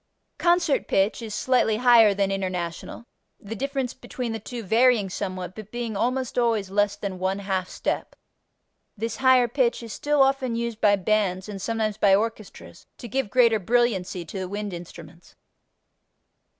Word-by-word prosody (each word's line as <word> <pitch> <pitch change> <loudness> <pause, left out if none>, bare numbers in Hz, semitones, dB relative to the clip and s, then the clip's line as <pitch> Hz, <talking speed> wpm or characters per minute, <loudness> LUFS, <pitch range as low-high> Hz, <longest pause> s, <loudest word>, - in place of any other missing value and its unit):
Concert 345 -4 +2
pitch 195 +5 +1
is 220 -2 -6
slightly 250 -4 +2
higher 230 -4 +6
than 195 0 0
International, 185 +2 -4 0.3
the 220 +1 -7
difference 270 0 -3
between 250 -2 -6
the 225 - -4
two 235 +2 -7
varying 225 -1 +3
somewhat, 185 -2 -4
but 215 -1 -10
being 235 -2 -4
almost 250 +3 -1
always 225 -5 0
less 205 0 +1
than 200 -3 -5
one 190 +1 -1
half 190 -2 -2
step. - - -3 0.8
This 225 +1 -3
higher 260 -2 +4
pitch 240 -1 0
is 225 -2 -7
still 295 -1 +2
often 270 -3 0
used 235 -1 -4
by 205 -1 +5
bands 195 -1 0
and 200 -2 -7
sometimes 220 -1 -2
by 200 -2 +5
orchestras 215 0 -5
to 240 - -8
give 245 -1 -2
greater 230 -2 +4
brilliancy 195 -5 0
to 175 +5 -7
the 185 -1 -4
wind 205 0 -4
instruments. 170 -1 -11
215 Hz, 160 wpm, -24 LUFS, 195-240 Hz, 0.8 s, higher